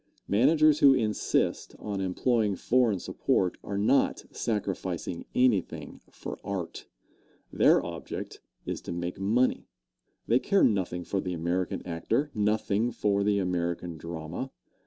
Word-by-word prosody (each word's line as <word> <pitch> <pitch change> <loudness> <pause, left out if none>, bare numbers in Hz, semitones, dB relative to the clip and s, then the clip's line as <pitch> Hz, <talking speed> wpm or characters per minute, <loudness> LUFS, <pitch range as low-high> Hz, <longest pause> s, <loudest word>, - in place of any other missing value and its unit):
Managers 150 +7 +4
who 140 -3 +7
insist 110 -4 0
on 100 -2 -4
employing 105 +2 +1
foreign 120 -1 +2
support 90 0 0
are 100 - -4
not 110 +7 +2
sacrificing 95 -5 -3
anything 125 -8 +1
for - - -8
art. 95 -4 -5 0.7
Their - - +4
object 85 -1 -6 0.2
is - - -4
to - - -7
make 85 +1 -4
money. 115 +6 +1 0.6
They 120 +3 +3
care 200 +6 +2
nothing 95 -5 +1
for 95 +2 -2
the 90 - -3
American 85 +2 -2
actor 90 - -1
nothing 105 +1 +1
for 100 -3 +1
the 105 0 +2
American 85 -2 -2
drama. 85 +9 -5
100 Hz, 125 wpm, -28 LUFS, 90-115 Hz, 0.7 s, who